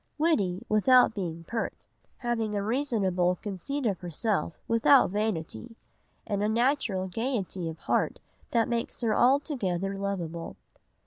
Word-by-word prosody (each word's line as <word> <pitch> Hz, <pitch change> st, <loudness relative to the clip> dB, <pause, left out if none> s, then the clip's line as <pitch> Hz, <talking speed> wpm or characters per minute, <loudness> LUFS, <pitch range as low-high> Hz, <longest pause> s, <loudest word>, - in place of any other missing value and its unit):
Witty 240 Hz, -, +1 dB
without 245 Hz, +3 st, +5 dB
being 170 Hz, -5 st, -4 dB
pert, 225 Hz, +7 st, -4 dB, 0.3 s
having 225 Hz, -3 st, -1 dB
a 200 Hz, -, -1 dB
reasonable 200 Hz, -8 st, +1 dB
conceit 210 Hz, +9 st, -4 dB
of 200 Hz, -5 st, 0 dB
herself 175 Hz, 0 st, -1 dB
without 230 Hz, 0 st, +5 dB
vanity, 205 Hz, -, -3 dB, 0.5 s
and 205 Hz, -1 st, -1 dB
a 210 Hz, -, +1 dB
natural 230 Hz, -5 st, +1 dB
gaiety 195 Hz, -5 st, -2 dB
of 160 Hz, -, -7 dB
heart -, -, 0 dB, 0.3 s
that 230 Hz, -2 st, +2 dB
makes 235 Hz, -1 st, -2 dB
her 220 Hz, -3 st, +1 dB
altogether 225 Hz, -, +1 dB
lovable. 175 Hz, -4 st, -4 dB
210 Hz, 125 wpm, -28 LUFS, 180-240 Hz, 0.5 s, without